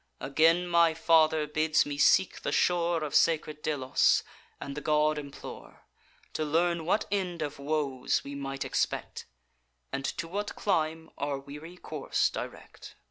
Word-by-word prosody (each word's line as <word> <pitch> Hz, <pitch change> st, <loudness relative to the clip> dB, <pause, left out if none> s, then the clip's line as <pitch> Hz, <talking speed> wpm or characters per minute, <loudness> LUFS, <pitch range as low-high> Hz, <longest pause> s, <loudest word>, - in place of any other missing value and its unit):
Again 165 Hz, +6 st, +3 dB
my 170 Hz, -2 st, +4 dB
father 160 Hz, -1 st, +3 dB
bids 155 Hz, +1 st, +2 dB
me 145 Hz, -1 st, -5 dB
seek 190 Hz, -, +4 dB
the -, -, -2 dB
shore 170 Hz, -2 st, +1 dB
Of 150 Hz, -, -4 dB
sacred 155 Hz, -2 st, +2 dB
Delos, 135 Hz, -5 st, +2 dB, 0.4 s
and 140 Hz, -, -6 dB
the 150 Hz, -, -5 dB
god 150 Hz, 0 st, +2 dB
implore, 140 Hz, -1 st, -10 dB, 0.5 s
To 155 Hz, -, -1 dB
learn 165 Hz, +2 st, +1 dB
what 210 Hz, -, +2 dB
end 180 Hz, -5 st, -1 dB
of 145 Hz, -1 st, -6 dB
woes 140 Hz, -3 st, -1 dB
we 140 Hz, -, -7 dB
might 135 Hz, -1 st, -4 dB
expect, -, -, -2 dB, 0.6 s
And 135 Hz, -, -3 dB
to 165 Hz, -, -3 dB
what 205 Hz, +4 st, -4 dB
clime 160 Hz, -4 st, -1 dB
our 140 Hz, 0 st, -1 dB
weary 150 Hz, +6 st, -10 dB
course -, -, -1 dB
direct. -, -, -8 dB
155 Hz, 145 wpm, -29 LUFS, 145-170 Hz, 0.6 s, my